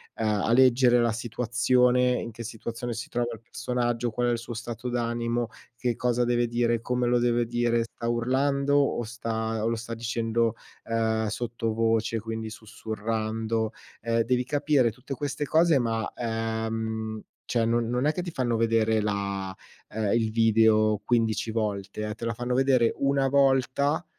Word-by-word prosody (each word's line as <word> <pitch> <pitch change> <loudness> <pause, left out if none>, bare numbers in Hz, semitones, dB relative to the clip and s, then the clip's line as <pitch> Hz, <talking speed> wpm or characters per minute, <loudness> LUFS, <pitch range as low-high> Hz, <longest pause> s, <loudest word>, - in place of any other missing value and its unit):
ehm 110 - -3 0.2
a - - +1
leggere 125 0 +5
la 120 -1 +2
situazione, 125 +2 +2
in 120 - -3
che 115 +2 -8
situazione 115 +2 -5
si 115 +1 -5
trova 120 0 -1
il 115 - -10
personaggio, 120 0 -2
qual 120 +2 0
è - - +2
il 120 - +1
suo 120 +1 -7
stato 120 +2 -5
d'animo, 120 -1 -1 0.3
che 120 0 -1
cosa 125 0 +1
deve 120 0 +1
dire, 120 -1 +1
come 125 +1 -1
lo 120 0 +3
deve 120 0 +2
dire, 120 0 +1
sta 115 0 -7
urlando 140 +4 +1
o 140 -4 +1
sta 110 -1 -3
o - - +1
lo 115 - +1
sta 115 +1 -6
dicendo, 115 0 0 0.3
ehm, 110 -1 0
sottovoce, 115 -1 0
quindi 110 0 -5
sussurrando. 110 +1 -3 0.3
Ehm, 115 0 +1
devi 125 +2 +1
capire 145 -2 +2
tutte 130 +4 -7
queste 145 +2 -3
cose 160 0 +4
ma, 115 -3 -1
ehm 110 -1 -3 0.2
cioè 115 -2 0
non 115 0 +1
non 125 +2 0
è 150 - +3
che 180 - -2
ti 175 - -5
fanno 125 -5 0
vedere 110 -1 +2
la 100 -2 -2 0.4
ehm, 105 -2 -1
il 115 -2 +1
video 110 -2 +4
15 115 -2 +1
volte, 105 -1 -3
eh, 105 - -3
te 115 - -11
la 115 0 -1
fanno 120 +2 -3
vedere 130 -2 +3
1 140 0 +2
volta 140 +3 +2
115 Hz, 165 wpm, -27 LUFS, 110-125 Hz, 0.4 s, leggere